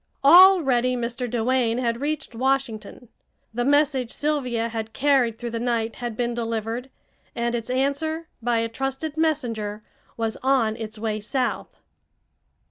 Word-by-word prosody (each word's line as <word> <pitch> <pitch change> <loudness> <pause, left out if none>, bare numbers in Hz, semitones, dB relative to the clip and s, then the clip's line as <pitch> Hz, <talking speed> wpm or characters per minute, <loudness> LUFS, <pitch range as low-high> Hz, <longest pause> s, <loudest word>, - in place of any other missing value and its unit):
Already 280 -7 +6
Mr. 240 +1 -3
Doane 240 0 +1
had 235 -1 -1
reached 300 -3 -3
Washington; 245 -3 -2 0.5
the 240 +2 -1
message 280 -2 +2
Sylvia 255 -6 -1
had 225 -1 -5
carried 260 -5 +2
through 240 0 -5
the 230 - -3
night 230 -2 -1
had 240 -3 -5
been 240 -1 -1
delivered, 230 +2 -3 0.5
and 235 -1 -1
its 235 0 -3
answer, 280 +5 -1
by 240 0 +1
a 230 0 0
trusted 270 +6 -4
messenger, 230 -10 -1 0.3
was 225 -1 -2
on 255 -5 +2
its 220 -1 -7
way 215 0 -2
south. 250 +4 -3
240 Hz, 135 wpm, -24 LUFS, 230-270 Hz, 0.5 s, Already